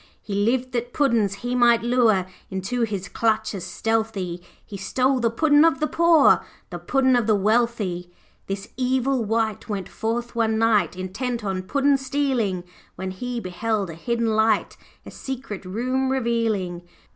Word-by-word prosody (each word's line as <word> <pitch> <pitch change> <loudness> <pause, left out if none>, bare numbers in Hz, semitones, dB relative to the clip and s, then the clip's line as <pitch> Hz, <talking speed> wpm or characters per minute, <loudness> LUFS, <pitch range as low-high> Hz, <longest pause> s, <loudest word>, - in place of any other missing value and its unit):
'He 205 - -7
lived 240 +6 +1
that 240 -1 -3
Puddin's 235 -8 +2
he 245 - -1
might 240 -2 +4
lure, 235 -6 +3 0.2
Into 190 +6 -3
his 200 -4 -2
clutches 220 -4 -1
stealthy; 195 -2 -2 0.2
He 205 - -9
stole 255 +7 +1
the 235 -1 +2
Puddin' 290 +5 +4
of 325 -5 +3
the 305 - +1
poor, 330 -2 +4 0.3
The - - -5
Puddin' 260 -1 +2
of 240 -3 +1
the 215 - +4
wealthy. 205 -4 0 0.4
'This 195 +1 -5
evil 260 0 +1
wight 220 -1 -1
went 200 -3 -3
forth 235 +2 -3
one 220 -1 +1
night 215 -7 +2
Intent 230 +6 -3
on 190 -2 -2
puddin' 280 +8 +2
stealing, 260 -9 -1 0.3
When 185 +1 -4
he 245 +6 -4
beheld 200 0 -2
a - - -8
hidden 230 +6 -1
light 220 -1 +2 0.3
A - - -9
secret 255 -7 -6
room 255 +7 -1
revealing. 230 -8 -1
225 Hz, 155 wpm, -23 LUFS, 200-250 Hz, 0.4 s, might